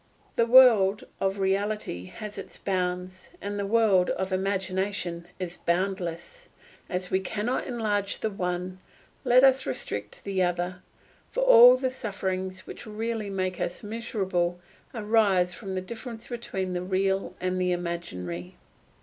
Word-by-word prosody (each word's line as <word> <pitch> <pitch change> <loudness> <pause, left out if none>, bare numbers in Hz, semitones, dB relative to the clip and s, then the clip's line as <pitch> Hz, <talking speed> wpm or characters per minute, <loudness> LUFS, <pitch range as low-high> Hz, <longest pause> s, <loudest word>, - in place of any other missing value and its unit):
The 235 -2 +3
world 225 -6 +7 0.2
of 195 +1 0
reality 195 - -1
has 210 - -8
its - - -9
bounds, 185 -1 -3
the 200 0 -3
world 205 -4 +4
of 190 0 -2
imagination 190 -2 -2
is 180 -2 -5
boundless; 185 - -2 0.4
as 180 0 -3
we 190 - +3
cannot 215 +6 -2
enlarge 210 -5 -1
the 220 - -1
one, 180 -1 -3 0.4
let 250 0 +5
us 265 -1 +5
restrict 105 -5 -4
the 195 -2 -1
other; 180 0 -1 0.5
for - - -2
all 250 - +9
the 260 0 -1
sufferings 190 -6 -4
which - - -9
really 220 0 -3
make 185 -2 -2
us 175 - -3
miserable 190 -6 -1 0.4
arise 210 -5 +3
from 195 -4 -6
the 185 - -1
difference 225 +3 -8
between 195 -6 -3
the 180 - -2
real 190 +1 0
and 185 0 -1
the 180 0 +1
imaginary. 90 - -4
190 Hz, 135 wpm, -27 LUFS, 180-215 Hz, 0.5 s, all